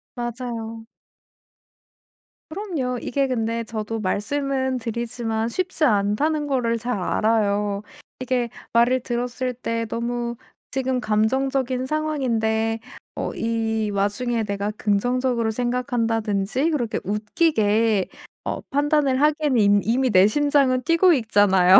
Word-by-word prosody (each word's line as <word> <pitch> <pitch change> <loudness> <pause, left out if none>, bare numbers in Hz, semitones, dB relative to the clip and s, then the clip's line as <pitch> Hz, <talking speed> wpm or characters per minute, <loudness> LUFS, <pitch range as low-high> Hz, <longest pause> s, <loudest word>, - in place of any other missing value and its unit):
맞아요. 230 -2 -5 1.6
그럼요. 315 -9 -3
이게 275 +1 0
근데 230 -2 -1
저도 225 0 -4
말씀은 260 +6 -1
드리지만 230 -1 -2
쉽지 365 +3 -2
않다는 280 +7 +2
거를 245 -4 +1
잘 240 0 -2
알아요. 205 -1 +1 0.4
이게 250 -2 -1 0.2
말을 240 +2 +4
들었을 250 +1 -2
때 230 -1 -3
너무 235 +1 -2 0.4
지금 260 -1 0
감정적인 255 +4 0
상황인데 230 -7 0 0.4
어 - - -3
이 225 -1 -1
와중에 210 +4 0
내가 200 0 -2
긍정적으로 235 +2 +1
생각한다든지 235 0 0
그렇게 240 -8 -1
웃기게 215 - +1 0.4
어 - - -3
판단을 285 -1 +1
하기에는 300 -3 +2
이 205 -1 +5
이미 255 +3 +1
내 190 -2 +6
심장은 275 0 +2
뛰고 335 +5 +5
있잖아요. 200 - +5
235 Hz, 260 characters per minute, -23 LUFS, 220-260 Hz, 1.6 s, 내